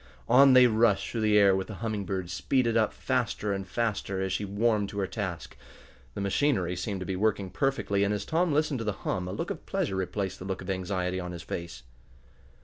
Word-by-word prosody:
On 135 +2 +7
they 130 0 +8
rushed 110 -4 +2
through 115 - -2
the 105 -1 +4
air 100 -2 +6
with 95 0 -2
the 105 - -7
Humming 110 -2 -3
Bird 95 -2 -3
speeded 115 +5 +1
up 110 -2 +3
faster 105 -1 -1
and 95 -1 -4
faster 100 -2 -2
as 95 0 -1
she 105 - -1
warmed 105 0 +1
to 100 - -8
her 100 - +1
task. 90 - -5 0.6
The - - -3
machinery 100 -3 +1
seemed 95 +1 -4
to - - -4
be 95 - -2
working 100 -1 0
perfectly, 135 -8 0
and 100 - +1
as 100 -1 -2
Tom 170 +1 +1
listened 150 -2 +1
to - - -3
the 105 -2 -1
hum 90 -1 -1
a - - -4
look - - -3
of - - -7
pleasure 95 - -1
replaced 95 +1 -3
the 90 - -8
look 95 -1 -4
of 95 - -3
anxiety 95 -1 -2
on 90 -1 -5
his 85 - -7
face. 85 0 -6
100 Hz, 225 wpm, -28 LUFS, 95-115 Hz, 0.6 s, they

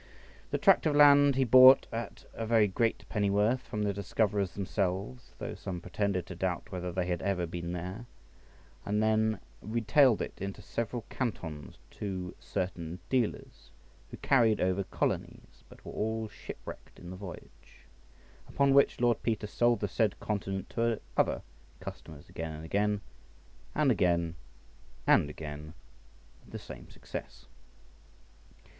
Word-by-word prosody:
This - - -2
tract - - +5
of 150 - +1
land 145 -1 +7
he 135 - +3
bought 130 +2 +8
at 115 0 -6
a 115 - -5
very 110 -2 +4
great 115 +4 -1
pennyworth 105 +4 +1
from 105 -4 -4
the 100 -1 0
discoverers 100 -1 0
themselves 100 +4 -3
(though - - -5
some 90 -2 -5
pretended 95 +1 -1
to 90 - -8
doubt 95 +3 -2
whether 90 -1 -4
they 90 +1 -1
had 90 -1 -2
ever 95 -2 0
been 85 +1 -5
there), 90 +7 -6 0.8
and 105 +1 0
then 110 0 +2 0.2
retailed 115 +3 +3
it - - -4
into 100 0 -4
several 115 +1 -3
cantons 80 - -4
to 95 -3 -5
certain 90 -3 -4
dealers, 125 -5 -2 0.4
who - - -9
carried 115 -5 +3
over 95 +2 +1
colonies, - - -3
but - - -16
were - - -7
all 110 +1 -2
shipwrecked 105 - -10
in 90 0 -9
the - - -6
voyage; 95 -1 -12 0.6
upon 140 -1 +3
which 140 0 +4
Lord 120 -1 +2
Peter 110 -2 -1
sold 120 +1 +2
the 105 - 0
said 105 +1 0
continent 95 -2 -3
to 115 -1 0 0.2
other - - +1 0.4
customers 75 -2 -9
again 80 -1 -5
and 80 +1 -8
again, 105 +3 0 0.7
and 150 -3 +3
again 85 -5 +2 0.7
and 75 - +4
again, 75 +1 -8 0.7
with - - -18
the - - -3
same - - -10
success. - - -8
100 Hz, 145 wpm, -30 LUFS, 90-115 Hz, 0.8 s, bought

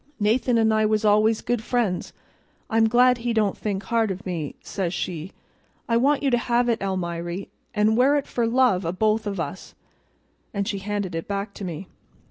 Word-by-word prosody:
'Nathan 230 +3 +2
an' 220 -1 +3
I 215 0 +2
was 215 0 +1
always 215 +1 +4
good 240 -2 -1
friends; 220 -7 -1 0.6
I'm 225 0 +4
glad 250 +1 +4
he 235 0 -1
don't 215 -3 +1
think 200 -2 -3
hard 230 -2 +1
of 190 +2 -5
me,' 165 -6 -4
says 185 -3 -3
she. 175 +1 -4 0.6
'I 230 - +2
want 280 +4 +2
you 275 - +2
to 240 - +3
have 240 0 +1
it, 230 -1 0
Almiry, 175 -1 -3 0.3
an' 215 +1 +3
wear 265 +5 +4
it 285 - 0
for 235 -2 -1
love 235 -6 +3
o' 165 - -1
both 215 +2 +1
o' 205 - -1
us,' 180 0 -6 0.8
and 200 0 -1
she 200 -3 -2
handed 200 -2 -3
it 165 0 -4
back 200 0 -3
to 205 - -8
me. 180 0 -5
215 Hz, 195 wpm, -24 LUFS, 190-235 Hz, 0.8 s, always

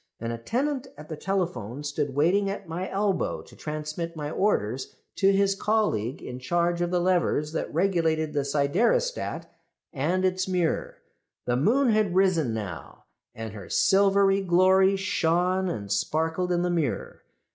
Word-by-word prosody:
An 115 +1 -3
attendant 260 - -2
at 150 +1 -11
the 155 - -4
telephone 165 - -3
stood 145 -1 -2
waiting 185 +7 +2
at 200 -1 -5
my 175 +3 -4
elbow 195 -1 -1
to - - -17
transmit 155 +2 -5
my 150 -1 -4
orders 130 - -1 0.2
to 195 0 +4
his 195 0 +3
colleague 195 - 0
in 125 0 -6
charge 170 +5 0
of 175 - 0
the 180 0 +1
levers 175 -4 +1
that 165 - -3
regulated 160 -3 +1
the 145 -2 0
siderostat 190 - 0 0.5
and 175 +6 0
its 185 0 0
mirror. 180 -3 -1 0.4
"The 120 - +1
moon 240 - +3
had 215 -4 +2
risen 185 -9 +3
now, 100 -8 -6 0.3
and 110 -1 -6
her 100 -3 -9
silvery 195 0 +4
glory 190 +1 +4
shone 185 0 +1
and 100 - -5
sparkled 160 - 0
in 175 0 +1
the 180 - 0
mirror. 160 -8 -2
175 Hz, 150 wpm, -26 LUFS, 145-195 Hz, 0.5 s, to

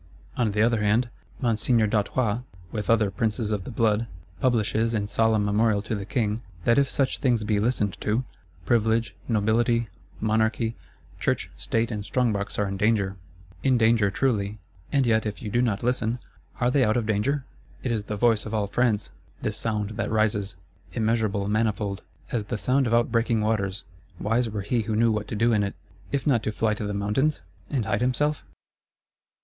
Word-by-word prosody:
On 120 -3 +1
the 105 +1 +2
other 115 -2 +2
hand, 110 +4 +2 0.3
Monseigneur 115 -1 +2
d'Artois, 105 +2 +1 0.3
with 105 -2 -4
other 110 -3 +3
Princes 110 0 -1
of 100 -3 -2
the - - -6
Blood, 115 -1 +1 0.3
publishes, 115 -1 +1
in 105 -2 0
solemn 110 -1 +2
Memorial 105 0 +2
to 110 - -3
the 100 -2 -4
King, 110 -2 0 0.2
that 120 +3 +4
if 140 -1 +2
such 135 -2 0
things 120 -5 +2
be 105 -1 +1
listened 105 -3 0
to, 110 +5 +1 0.4
Privilege, 115 -2 +2
Nobility, 115 +1 +2 0.3
Monarchy, 110 +1 +1 0.4
Church, - - -1
State 115 - -1
and 105 -2 -3
Strongbox 110 -3 0
are 105 - +1
in 100 0 -3
danger. 100 -2 +1 0.5
In 130 -2 +3
danger 110 -3 +4
truly: 105 -3 0 0.3
and 140 -2 +3
yet 110 -2 +2
if 105 - -4
you 105 - -5
do 120 - +2
not 110 -5 0
listen, 120 -1 0 0.4
are 125 0 +2
they 135 0 +4
out 110 +1 +2
of 120 - 0
danger? 130 +6 0 0.4
It 125 - -1
is 110 -3 -1
the 105 - -3
voice 110 -1 +2
of 110 - -3
all 105 -1 +1
France, 110 0 0 0.3
this 105 - -1
sound 105 -2 -2
that - - -1
rises. 105 -3 +1 0.4
Immeasurable, 110 -3 0
manifold; 105 -2 0 0.3
as 110 -4 -1
the 115 - -3
sound 130 +4 +2
of 115 - 0
outbreaking 115 -1 +2
waters: 105 -3 -1 0.4
wise 115 +3 +1
were 105 -1 -3
he 115 +4 0
who 110 0 -2
knew 115 +1 +4
what 105 -1 -2
to - - -4
do 115 +2 +3
in 105 - +3
it,—if 135 +7 -5
not 130 -7 +3
to 110 - -2
fly 110 0 +1
to 105 -1 -4
the 105 - -3
mountains, 105 +10 0 0.3
and 125 -7 -1
hide 110 0 0
himself? 145 +4 +1
110 Hz, 180 wpm, -26 LUFS, 105-120 Hz, 0.5 s, that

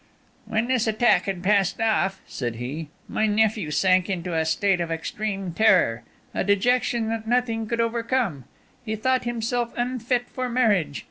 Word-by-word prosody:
"When 220 +2 0
this 250 -3 +1
attack 220 +2 +3
had 190 -3 -3
passed 195 -1 +2
off," 210 -4 +1
said 120 -3 -4
he, 140 +7 -5 0.2
"my 215 - 0
nephew 210 -4 +1
sank 185 +4 +2
into 180 -2 -3
a 160 0 +1
state 190 +2 +1
of 170 - -2
extreme 195 +2 -3
terror, 180 - +3 0.3
a - - 0
dejection 235 +3 +1
that 225 -1 -3
nothing 230 -2 0
could 235 +1 -2
overcome. 230 - -1 0.4
He 220 -2 -3
thought 255 +3 0
himself 240 0 -2
unfit 245 0 -1
for 255 -1 -4
marriage. 205 - +1
215 Hz, 155 wpm, -24 LUFS, 185-235 Hz, 0.4 s, attack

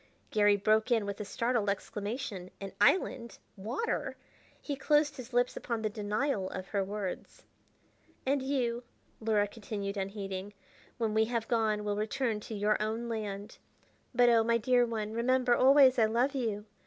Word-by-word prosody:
Garry 205 -1 +4
broke 215 +3 +2
in 225 -4 +2
with 200 0 -5
a - - -4
startled 230 0 0
exclamation. 205 -1 -4
An 195 -1 -6
island! 235 - +2 0.2
Water! 230 - -3 0.4
He 285 - -4
closed 295 +1 +2
his 255 -1 -9
lips 245 0 +1
upon 230 -2 -3
the 215 - 0
denial 210 0 -1
of 185 0 -7
her 200 -2 0
words. 200 -1 -5 0.8
"And 275 +1 +1
you," 250 -3 -1 0.4
Luhra 215 -2 +2
continued 200 -2 -5
unheeding, 195 0 -5 0.4
"when 225 -3 -1
we 220 0 +3
have 230 -1 -2
gone, 220 -3 +1
will 205 -1 -1
return 220 +1 -1
to 215 +1 -7
your 210 +1 +1
own 225 +2 -2
land. 210 -2 -5 0.5
"But, 245 -1 +4
oh, 230 -1 +5
my 230 +1 +3
dear 245 +1 +3
one, 220 -2 -3
remember 245 +1 +2
always 265 0 +6
I 225 - +6
love 240 +6 +1
you. 220 -6 -2
220 Hz, 160 wpm, -31 LUFS, 205-245 Hz, 0.8 s, always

